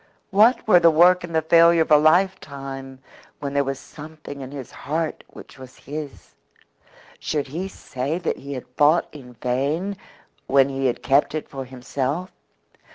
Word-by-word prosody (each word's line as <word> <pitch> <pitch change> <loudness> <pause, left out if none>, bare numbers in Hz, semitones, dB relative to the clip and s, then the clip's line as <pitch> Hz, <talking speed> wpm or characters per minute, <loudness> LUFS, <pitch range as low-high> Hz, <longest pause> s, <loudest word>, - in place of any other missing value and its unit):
What 220 +6 +4
were 180 -5 +7
the 170 -1 +6
work 175 +3 +5
and 170 -2 -6
the 160 - +2
failure 170 +1 +5
of 160 - -11
a - - +9
lifetime 140 -6 0 0.4
when 140 -1 -5
there 140 0 +2
was 135 0 -3
something 150 -1 -11
in 130 - -7
his 135 -3 -8
heart 160 +1 -4
which - - -14
was 130 -1 -12
his? 145 0 -8 0.9
Should 145 -3 -3
he 175 +7 -4
say 140 -4 -4
that 180 - -2
he 140 +1 -8
had 130 - -6
fought 150 +4 +4
in 130 -5 -12
vain 140 - -2 0.5
when 135 0 +4
he 135 -1 -1
had 120 -1 -3
kept 140 +5 +2
it 155 - -4
for 135 -1 -7
himself? 135 +6 -4
145 Hz, 165 wpm, -22 LUFS, 135-165 Hz, 0.9 s, a